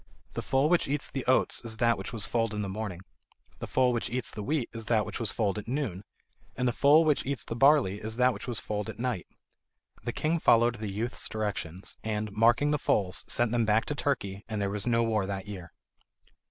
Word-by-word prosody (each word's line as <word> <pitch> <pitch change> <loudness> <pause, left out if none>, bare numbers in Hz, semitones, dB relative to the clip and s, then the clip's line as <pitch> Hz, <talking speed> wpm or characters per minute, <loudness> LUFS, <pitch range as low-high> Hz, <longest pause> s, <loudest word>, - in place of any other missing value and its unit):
The - - -3
foal 135 +2 +2
which 175 +1 +2
eats 145 +1 -1
the 135 - -3
oats 130 -1 +2
is 110 -1 -3
that 115 0 +3
which 95 - -6
was 115 -3 -1
foaled 115 -2 0
in 105 - -2
the - - -3
morning; 95 -2 -5 0.6
the - - -5
foal 125 -1 +2
which 120 0 -2
eats 125 +1 -2
the 105 - -6
wheat 140 +2 -1
is 115 -1 -7
that 110 -3 +2
which - - -5
was 115 -4 +3
foaled 105 -2 0
at 105 - -10
noon; 115 -8 -2 0.5
and 125 - 0
the - - +3
foal 150 +6 +5
which 150 -2 +2
eats 140 -2 -3
the 115 - -4
barley 135 -6 +4
is 110 +1 -4
that 125 +1 +3
which - - -8
was 120 -3 -1
foaled 105 -1 -4
at - - -7
night." 120 -6 -2 0.8
The 120 - -2
king 160 +6 0
followed 120 -3 +4
the 110 -2 -4
youth's 110 +5 -3
directions, 100 -5 -4
and, 105 -1 -2
marking 120 +7 +3
the 150 - +1
foals, 95 -5 +1
sent 120 -2 +1
them 120 -1 +2
back 110 +1 +2
to - - -2
Turkey, 105 -9 -2
and 110 -2 -2
there 100 -1 -1
was 105 +1 -3
no 115 -1 +3
war 110 -4 0
that 100 0 -4
year. 90 -5 -8
115 Hz, 230 wpm, -29 LUFS, 105-125 Hz, 0.8 s, foal